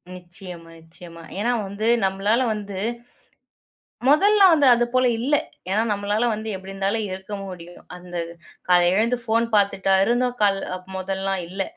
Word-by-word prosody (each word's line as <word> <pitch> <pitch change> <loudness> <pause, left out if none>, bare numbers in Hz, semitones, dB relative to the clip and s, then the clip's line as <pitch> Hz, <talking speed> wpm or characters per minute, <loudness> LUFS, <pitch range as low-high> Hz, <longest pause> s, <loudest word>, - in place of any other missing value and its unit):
நிச்சயமா 175 -1 -11
நிச்சயமா! 165 +1 -14 0.2
ஏன்னா 235 +4 +1 0.2
வந்து 200 +3 -3 0.2
நம்மளால 205 +6 +1
வந்து 205 -2 -6 1.3
மொதல்லா 395 +7 +5
வந்து 290 -3 +4
அது 240 0 +1
போல 255 0 +3
இல்ல. 270 +6 0 0.4
ஏன்னா, 215 +3 +2
நம்மளால 205 +2 0
வந்து 220 +1 -5
எப்படி 190 +1 -10
இருந்தாலும் 195 +3 -1
இருக்க 190 +2 -7
முடியும்! 175 -2 -10
அந்த 180 0 -12 0.5
காலைல 175 -1 +5
எழுந்து 230 +5 +2
ஃபோன் 230 0 +1
பார்த்துட்டா 195 -1 +2
இருந்தோம் 245 +2 0
கால் 195 -1 +3 0.4
முதல்லாம்? 190 0 -2
இல்ல. 190 +2 -3
200 Hz, 140 wpm, -22 LUFS, 185-230 Hz, 1.3 s, மொதல்லா